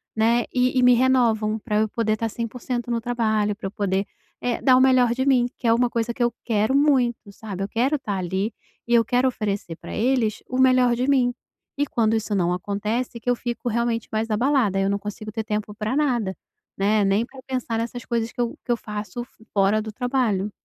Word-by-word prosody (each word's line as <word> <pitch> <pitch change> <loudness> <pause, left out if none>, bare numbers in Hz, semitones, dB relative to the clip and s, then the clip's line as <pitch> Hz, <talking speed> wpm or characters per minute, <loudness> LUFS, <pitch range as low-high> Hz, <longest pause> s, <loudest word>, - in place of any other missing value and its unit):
né, 230 +2 +3
e 255 +1 +2
e - - +3
me 250 0 +7
renovam 235 -4 +2
pra 210 0 -2
eu 215 0 +1
poder 215 0 0
tá 225 +1 -2
100% 240 +2 -4
no 235 -1 0
trabalho, 220 -3 0
pra 200 - -5
eu - - -7
poder, 195 -1 -1 0.4
eh, 245 -1 -1
dar 255 -2 +5
o - - +5
melhor 255 -2 +4
de 260 +2 -1
mim, 255 -3 +4
que 245 - -3
é 225 - +5
uma 245 +1 +2
coisa 235 0 -1
que 245 - -1
eu 240 -1 +1
quero 220 +1 +1
muito, 255 -7 +2
sabe, 200 -2 -7
eu - - -2
quero 260 +8 0
tá 210 -6 -3
ali 190 +4 -2 0.3
e 240 - 0
eu 235 -1 +6
quero 250 +1 +2
oferecer 205 -8 -3
pra - - -9
eles 225 -2 +1
o 255 - -3
melhor 255 -2 +4
de 250 +2 -1
mim, 250 -3 +3 0.4
e 290 - +2
quando 225 -5 +1
isso 220 -1 -2
não 175 -2 +1
acontece, 210 +6 -3
que 240 - -3
eu 245 - +3
fico 240 0 -5
realmente 235 0 -1
mais 220 +1 -1
abalada, 225 -3 +2
eu 195 0 +1
não 200 0 0
consigo 210 +1 -7
ter 220 0 -3
tempo 210 -1 -3
pra 215 +3 -2
nada, 245 -10 +1 0.4
né, 205 +2 +2
nem 200 +3 +2
pra 265 +2 -14
pensar 255 -3 -2
nessas 235 +1 -4
coisas 235 -1 -1
que - - -16
eu 235 -1 -2
que - - -2
eu 240 - +2
faço 210 +1 -6 0.3
fora 200 +2 +3
do 220 0 -6
trabalho. 230 -4 0
230 Hz, 220 wpm, -23 LUFS, 210-245 Hz, 0.4 s, me